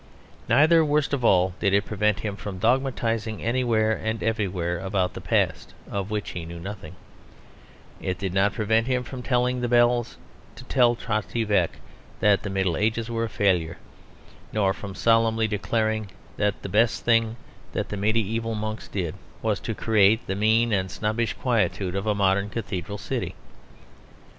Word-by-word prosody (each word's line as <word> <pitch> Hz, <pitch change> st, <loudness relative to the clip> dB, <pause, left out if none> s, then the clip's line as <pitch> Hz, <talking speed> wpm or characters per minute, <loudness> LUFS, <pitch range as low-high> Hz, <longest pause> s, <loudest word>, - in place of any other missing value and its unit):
Neither, 160 Hz, +3 st, +6 dB
worst 150 Hz, -1 st, +1 dB
of 135 Hz, -3 st, -1 dB
all, 95 Hz, -4 st, +4 dB
did 100 Hz, -2 st, +2 dB
it 100 Hz, -, +2 dB
prevent 105 Hz, 0 st, 0 dB
him 105 Hz, -2 st, -3 dB
from 95 Hz, 0 st, -6 dB
dogmatising 115 Hz, -1 st, 0 dB
anywhere 115 Hz, -2 st, +1 dB
and 110 Hz, 0 st, -3 dB
everywhere 90 Hz, -6 st, -1 dB
about 95 Hz, 0 st, -1 dB
the -, -, -7 dB
past, -, -, 0 dB, 0.2 s
of 100 Hz, 0 st, -3 dB
which 105 Hz, -1 st, -3 dB
he 85 Hz, -, -5 dB
knew 85 Hz, +1 st, -8 dB
nothing; 95 Hz, -3 st, -8 dB, 1.1 s
it 90 Hz, -1 st, -2 dB
did 95 Hz, -2 st, -3 dB
not 100 Hz, +2 st, +2 dB
prevent 110 Hz, +2 st, +1 dB
him 125 Hz, -1 st, 0 dB
from 125 Hz, 0 st, -7 dB
telling 125 Hz, 0 st, +1 dB
the 120 Hz, -, 0 dB
bells 120 Hz, 0 st, +2 dB, 0.4 s
to -, -, -11 dB
tell 125 Hz, -2 st, +3 dB
Trotty 115 Hz, 0 st, -2 dB
Veck 100 Hz, -6 st, +1 dB, 0.4 s
that 105 Hz, -1 st, +4 dB
the 105 Hz, -, -5 dB
Middle 95 Hz, -3 st, 0 dB
Ages 115 Hz, +2 st, 0 dB
were 115 Hz, 0 st, 0 dB
a -, -, -5 dB
failure, 90 Hz, -7 st, +1 dB, 0.7 s
nor 100 Hz, -3 st, +2 dB
from 100 Hz, -1 st, -8 dB
solemnly 115 Hz, 0 st, +3 dB
declaring 110 Hz, 0 st, -1 dB, 0.3 s
that 105 Hz, -1 st, -1 dB
the -, -, -3 dB
best 110 Hz, +4 st, +2 dB
thing 115 Hz, -1 st, +3 dB, 0.4 s
that -, -, -2 dB
the -, -, -4 dB
mediæval 110 Hz, +2 st, 0 dB
monks 110 Hz, +1 st, -4 dB
ever -, -, -8 dB
did 85 Hz, +1 st, -4 dB, 0.3 s
was 110 Hz, -3 st, +1 dB
to 115 Hz, -, -4 dB
create 110 Hz, 0 st, +3 dB
the 95 Hz, -, -2 dB
mean 110 Hz, +3 st, +2 dB
and 95 Hz, -1 st, 0 dB
snobbish 110 Hz, +3 st, -1 dB
quietude 105 Hz, -6 st, 0 dB
of 100 Hz, +2 st, -2 dB
a 105 Hz, -, +2 dB
modern 100 Hz, 0 st, +2 dB
cathedral 100 Hz, -2 st, -4 dB
city. -, -, -4 dB
110 Hz, 165 wpm, -25 LUFS, 100-115 Hz, 1.1 s, Neither